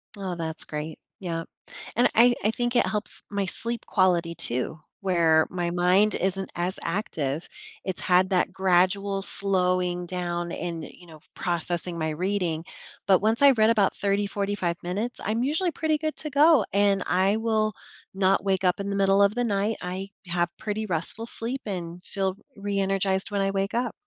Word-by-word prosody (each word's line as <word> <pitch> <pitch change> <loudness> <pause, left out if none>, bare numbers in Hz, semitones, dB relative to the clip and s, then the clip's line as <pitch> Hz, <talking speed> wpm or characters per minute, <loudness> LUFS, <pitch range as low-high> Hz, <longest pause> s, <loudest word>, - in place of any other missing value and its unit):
Oh, 190 -3 -4
that's 160 -1 -4
great, 150 +1 -5 0.2
yep, 165 -3 -4 0.5
and 240 - +5
I 240 +2 +6
I 215 - +3
think 240 +2 -2
it 240 - +4
helps 210 0 -4
my 200 -1 -1
sleep 235 +4 -3
quality 175 -4 +2
too, 125 +6 -2 0.2
where 170 -4 +4
my 175 -1 -2
mind 180 +4 +3
isn't 190 0 -1
as 175 +2 -2
active, 160 -5 -2 0.4
it's 190 -2 -3
had 185 +1 +3
that 185 -2 +2
gradual 190 +2 +2
slowing 180 -3 0
down 175 -1 -3
and, 170 -2 -4
you 175 - -14
know, 155 -2 -13 0.2
processing 175 0 -2
my 160 -1 -1
reading, 175 -1 -1 0.4
but 190 -2 +6
once 220 +3 +1
I 280 -1 +9
read 220 -3 +4
about 210 -4 +3
30, 200 0 +1
45 200 -4 -2
minutes, 205 +8 -3
I'm 225 +3 0
usually 325 +6 +1
pretty 315 0 0
good 310 0 -2
to 305 - -5
go, 290 -3 +5
and 200 -1 +3
I 190 +3 +2
will 220 -2 +1 0.4
not 195 0 +2
wake 190 -1 +1
up 180 0 +2
in 200 0 -3
the 200 - -1
middle 195 0 +4
of 200 +3 +4
the 245 - +1
night, 210 0 0
I 185 +2 -4 0.2
have 175 0 0
pretty 215 0 -3
restful 185 +5 -3
sleep 235 +3 -4
and 175 -4 -5
feel 190 -1 -2 0.2
reenergized 195 -1 0
when 200 - 0
I 195 0 +1
wake 195 +1 -1
up. 240 0 0
195 Hz, 175 wpm, -26 LUFS, 175-210 Hz, 0.5 s, I